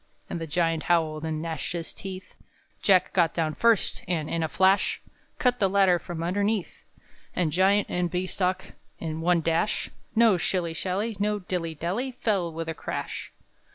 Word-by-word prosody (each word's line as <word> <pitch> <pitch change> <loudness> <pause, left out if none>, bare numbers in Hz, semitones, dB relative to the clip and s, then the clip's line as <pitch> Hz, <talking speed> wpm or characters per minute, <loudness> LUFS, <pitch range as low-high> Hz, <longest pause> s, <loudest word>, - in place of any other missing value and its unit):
_" - - -15
And 170 - -3
the 165 - -4
Giant 165 0 +1
howled, 160 -2 +2
and 155 0 -2
gnashed 165 +1 -3
his 170 -1 -4
teeth. 190 -1 -8 0.5
Jack 190 -3 +4
got 170 -3 +3
down 160 -2 0
first, 230 +1 +2
and, 160 -3 -1
in 165 - 0
a 160 - +1
flash, 190 +6 +3 0.4
Cut 250 -4 +2
the 195 - +3
ladder 190 -2 +4
from 170 -1 -5
underneath; 200 +2 -1 0.5
And 175 -4 +1
Giant 195 +5 +4
and 180 -1 -1
Bean 180 +1 -1
stalk, 185 0 -2 0.2
in 160 -1 -4
one 175 0 +3
dash, 165 +5 0 0.2
No 225 -4 +5
shilly 175 -1 -1
shally, 195 +6 -2
no 210 +1 +1
dilly 180 -4 -3
dally, 200 - -2
Fell 200 -8 0
with 165 0 -5
a 165 - -2
crash. - - -5
180 Hz, 175 wpm, -27 LUFS, 165-195 Hz, 0.5 s, No